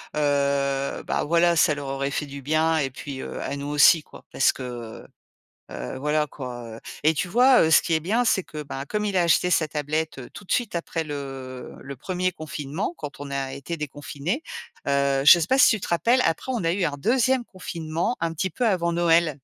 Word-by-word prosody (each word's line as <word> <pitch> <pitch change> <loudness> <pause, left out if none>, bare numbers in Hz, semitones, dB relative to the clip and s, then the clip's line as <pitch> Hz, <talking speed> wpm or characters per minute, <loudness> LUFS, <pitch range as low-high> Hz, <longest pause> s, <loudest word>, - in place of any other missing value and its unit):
heu 140 -2 0
bah, - - -1
voilà, 170 +2 +3
ça 160 -1 +4
leur 145 -1 -6
aurait 135 +1 -2
fait 150 - -2
du 140 0 -8
bien 160 +2 +2
et 135 -3 -1
puis, 135 +1 -7
heu, - - -6
à - - -3
nous 140 0 -5
aussi 150 +2 +5
quoi. - - -15
Parce 135 - +3
que, - - -10 0.4
heu, - - -16 0.7
heu, 65 - -6
voilà 150 +2 +1
quoi, 125 -4 -7
heu - - -12 0.2
et 160 +1 +4
tu 180 - -2
vois, 250 +6 +5
heu, 160 - +2
ce - - +7
qui 165 - 0
est 160 - +1
bien, 220 +9 +1
c'est 190 - +3
que 150 -2 -8
bah, 135 -1 -6
comme 210 +5 -2
il 200 - -1
a 180 - +4
acheté 170 +1 +3
sa 165 -3 +3
tablette 150 0 -2
tout 205 - -10
de - - -4
suite 235 -7 0
après 165 -1 -2
le 135 -3 -7
le 140 0 -8
1er 185 +4 -2
confinement, 155 +1 -4
quand 145 -1 -8
on 140 -1 -7
a 135 -1 -3
été 140 +5 -5
déconfinés, 150 - -4 0.5
heu, 140 -1 +2
je 175 - +9
sais 165 - 0
pas 265 - +2
si - - +7
tu 220 - 0
te - - -6
rappelles, 235 +9 +3
après 165 +11 -1
on 220 -8 -2
a 165 - +2
eu 185 -1 0
un 145 -3 -1
2ème 255 - +2
confinement 170 +3 -3
un 165 -1 -1
petit 190 +4 -2
peu 245 +9 -1
avant 170 -3 +1
Noël? 170 -1 +3
155 Hz, 225 wpm, -24 LUFS, 140-175 Hz, 0.7 s, je